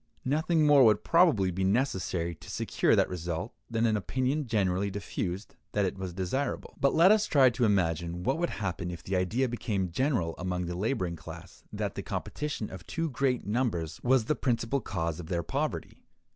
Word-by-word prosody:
Nothing 155 +3 +2
more 145 -2 +7
would 110 -3 +4
probably 140 - +4
be 95 +2 -2
necessary 95 -6 0
to 80 0 -13
secure - - +1
that - - +3
result, 85 +3 -4 0.2
than 115 0 +1
an 110 -2 +2
opinion 130 +7 -1
generally 100 -3 +1
diffused 100 +3 -4 0.2
that 105 -1 +2
it 95 - -2
was 95 -2 -5
desirable. 95 +11 -3
But 140 - +3
let 175 +5 +7
us 215 0 +4
try 135 -4 +5
to 120 0 +1
imagine 85 -3 0
what 135 - 0
would 175 - 0
happen 90 -3 -3
if 85 - -7
the 95 - -2
idea 105 +9 +1
became 105 -6 -2
general 115 - 0
among 90 0 -2
the 85 - -4
laboring 95 -4 -1
class - - -11
that - - -3
the - - -4
competition 150 -8 -4
of 95 -3 -8
too 165 -2 -2
great 130 -1 0
numbers 105 -8 -1
was 125 -2 +3
the 150 - +2
principal 125 +1 0
cause 80 0 -3
of 85 - -7
their 85 -1 -1
poverty. - - -3
105 Hz, 185 wpm, -29 LUFS, 90-130 Hz, 0.2 s, more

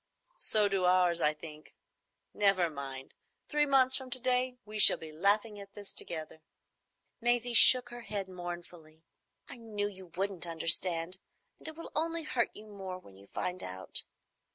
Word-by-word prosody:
"So 210 -2 +2
do 195 -2 0
ours, 180 -2 +3
I 150 - +4
think. 155 0 -12 0.6
Never 195 -5 +2
mind. 135 -2 -8 0.3
Three 295 -1 +1
months 260 -2 +3
from 260 -1 -2
to 255 0 +5
day 250 0 0
we 215 0 -6
shall - - +10
be 160 -1 -10
laughing 205 +6 0
at 200 0 -12
this 205 -1 -10
together." 160 -1 -4 0.8
Maisie 240 0 0
shook 245 +2 +6
her 240 0 -9
head 205 -4 -5
mournfully. 175 -3 -9 0.4
"I - - -10
knew 215 -3 -4
you 190 -2 -9
wouldn't 185 0 -1
understand, 165 +2 +2 0.4
and - - -12
it 315 - -8
will 330 - -10
only 330 +2 0
hurt 255 -6 0
you 215 - -12
more 195 -3 -8
when 100 - -17
you 100 +1 -17
find 180 - -4
out. 95 0 -4
195 Hz, 165 wpm, -31 LUFS, 170-240 Hz, 0.8 s, shall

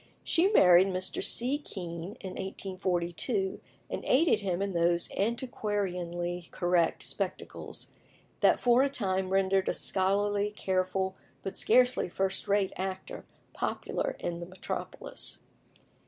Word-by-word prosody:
She 340 +3 +3
married 185 - +6
Mr. 185 -1 -1
C. 260 +5 +3
Kean 175 - -6
in 190 - -5
1842, 190 +1 -2 0.3
and - - -5
aided 285 -4 +4
him 185 -4 -1
in 200 -1 -1
those 170 0 +2
antiquarianly 180 -6 -2
correct 175 -1 +1
spectacles - - -4 0.5
that - - +4
for 245 +1 +5
a 280 - +3
time 190 -8 0
rendered 195 0 +2
a - - 0
scholarly, 200 +2 +1
careful, 190 0 0 0.3
but 195 0 -4
scarcely 250 -2 +3
first 190 +2 -1
rate 200 -1 +2
actor 190 0 -5 0.3
popular - - -2
in 170 -1 -4
the 170 - -6
metropolis. 185 +1 -4
190 Hz, 120 wpm, -30 LUFS, 180-205 Hz, 0.5 s, married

